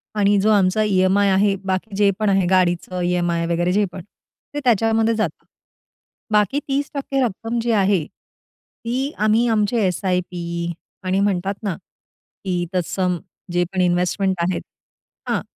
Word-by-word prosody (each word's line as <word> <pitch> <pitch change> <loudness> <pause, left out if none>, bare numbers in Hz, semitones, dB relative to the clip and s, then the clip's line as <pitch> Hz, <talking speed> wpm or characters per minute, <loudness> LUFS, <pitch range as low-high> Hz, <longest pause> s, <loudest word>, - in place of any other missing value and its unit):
आणि 205 -1 +3
जो 215 - +2
आमचा 200 0 +3
ई-एम-आय 200 0 +3
आहे. 195 +1 +3
बाकी 190 +2 -2
जे 200 0 +4
पण 215 -1 +2
आहे 195 -2 +3
गाडीचं 180 0 +1
ई-एम-आय 175 -1 0
वगैरे 175 +1 +1
जे 205 +2 +2
पण 185 - -8 0.5
ते 290 - -2
त्याच्यामध्ये 225 -1 +3
जातं. 220 - -3 0.9
बाकी 210 +6 +2
30% 275 -1 -1
रक्कम 230 +1 -2
जी 235 +1 0
आहे 190 -5 +2
ती 255 - -7
आम्ही 215 +3 +3
आमचे 215 +2 +1
एस-आय-पी 175 -2 -2 0.3
आणि 185 +1 0
म्हणतात 195 -1 0
ना, 195 -5 -1 0.7
की 180 -2 -1
तत्सम 180 0 0 0.4
जे 175 0 +2
पण 185 - +1
इन्व्हेस्टमेंट 180 +2 +1
आहेत 175 +1 0 0.7
हां, - - +1
195 Hz, 140 wpm, -21 LUFS, 180-215 Hz, 0.9 s, जे